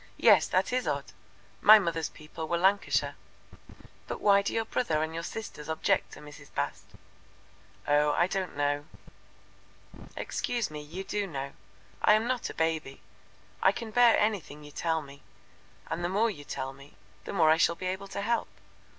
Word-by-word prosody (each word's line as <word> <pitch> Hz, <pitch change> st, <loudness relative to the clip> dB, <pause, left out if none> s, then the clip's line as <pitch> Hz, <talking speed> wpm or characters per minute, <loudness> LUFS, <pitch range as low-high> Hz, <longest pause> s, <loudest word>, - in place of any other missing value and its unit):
Yes, -, -, +6 dB
that -, -, +1 dB
is 255 Hz, 0 st, 0 dB
odd. -, -, -2 dB, 0.5 s
My 215 Hz, +1 st, +10 dB
mother's 165 Hz, -5 st, -1 dB
people 155 Hz, +1 st, -8 dB
were 170 Hz, -, 0 dB
Lancashire. 195 Hz, +3 st, +2 dB, 0.9 s
But -, -, -5 dB
why 200 Hz, -1 st, +5 dB
do 200 Hz, -, -2 dB
your 225 Hz, 0 st, -1 dB
brother 160 Hz, -10 st, 0 dB
and 160 Hz, 0 st, -4 dB
your 165 Hz, -, -3 dB
sisters 170 Hz, -5 st, -7 dB
object 160 Hz, 0 st, 0 dB
to -, -, -11 dB
Mrs. 150 Hz, -1 st, -13 dB
Bast?" -, -, -3 dB, 1.0 s
"Oh, 150 Hz, 0 st, +4 dB
I 175 Hz, -, +3 dB
don't 185 Hz, -4 st, -3 dB
know." 145 Hz, 0 st, 0 dB, 1.3 s
"Excuse 240 Hz, -8 st, -2 dB
me, 150 Hz, -1 st, -6 dB
you 165 Hz, +6 st, -7 dB
do 205 Hz, 0 st, -2 dB
know. 140 Hz, -4 st, -5 dB, 0.5 s
I 210 Hz, -, +6 dB
am 215 Hz, +1 st, +1 dB
not 250 Hz, -1 st, -1 dB
a -, -, -8 dB
baby. 160 Hz, -4 st, -1 dB, 0.6 s
I 190 Hz, -, +6 dB
can 225 Hz, +2 st, -7 dB
bear 240 Hz, 0 st, +6 dB
anything 195 Hz, -9 st, -1 dB
you 150 Hz, -, -11 dB
tell 160 Hz, 0 st, -1 dB
me, 140 Hz, 0 st, -13 dB, 0.7 s
and 175 Hz, -, -3 dB
the 175 Hz, -, 0 dB
more 215 Hz, +4 st, +2 dB
you 145 Hz, -7 st, -10 dB
tell 135 Hz, -1 st, -4 dB
the 140 Hz, +1 st, -15 dB, 0.4 s
more 160 Hz, -5 st, +5 dB
I 160 Hz, -, +5 dB
shall 170 Hz, 0 st, +3 dB
be 185 Hz, -, -7 dB
able 190 Hz, +2 st, -3 dB
to 195 Hz, -, -5 dB
help. 235 Hz, +2 st, 0 dB
170 Hz, 175 wpm, -29 LUFS, 150-205 Hz, 1.3 s, My